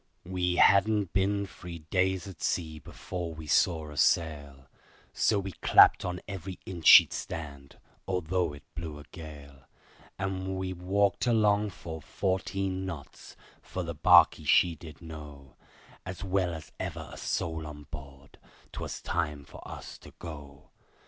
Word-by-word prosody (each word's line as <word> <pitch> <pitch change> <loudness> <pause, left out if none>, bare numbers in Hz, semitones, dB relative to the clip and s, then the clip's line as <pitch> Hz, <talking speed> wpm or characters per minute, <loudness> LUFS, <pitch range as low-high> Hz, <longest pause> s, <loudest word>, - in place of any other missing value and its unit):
We 90 0 -1
hadn't 100 0 +4
been 100 +1 +1
three 90 -2 -9
days 95 +4 0
at 95 - -11
sea 80 -3 -1
before 85 +1 -6
we 80 0 -8
saw 80 0 +2
a 75 - -10
sail, 70 -4 +1 0.5
So 110 - +2
we 100 -1 -3
clapped - - +6
on 90 0 -3
every 95 -2 -6
inch 85 -4 -3
she'd - - +10
stand, 70 -4 -7 0.3
although 90 -2 0
it 70 - -12
blew 80 -1 -6
a 75 - -10
gale, 70 -5 -11 0.5
And 95 0 -3
we 95 0 -3
walked 95 +4 +1
along 105 -3 +3
full 80 -3 -8
fourteen 95 +2 -2
knots, 85 -7 -8 0.3
for 90 - -5
the 85 0 -4
barkie 75 0 +6
she 90 -2 +5
did 80 +1 -12
know, 75 -5 -10 0.5
As 95 -1 -7
well 95 -2 +1
as 80 - -10
ever - - -5
a - - -9
soul 80 -1 -2
on 75 -1 -9
board, 70 -2 -11 0.3
'twas - - -6
time 75 -4 -2
for - - -12
us - - -9
to - - -14
go. 70 -4 -10
85 Hz, 150 wpm, -29 LUFS, 75-95 Hz, 0.5 s, she'd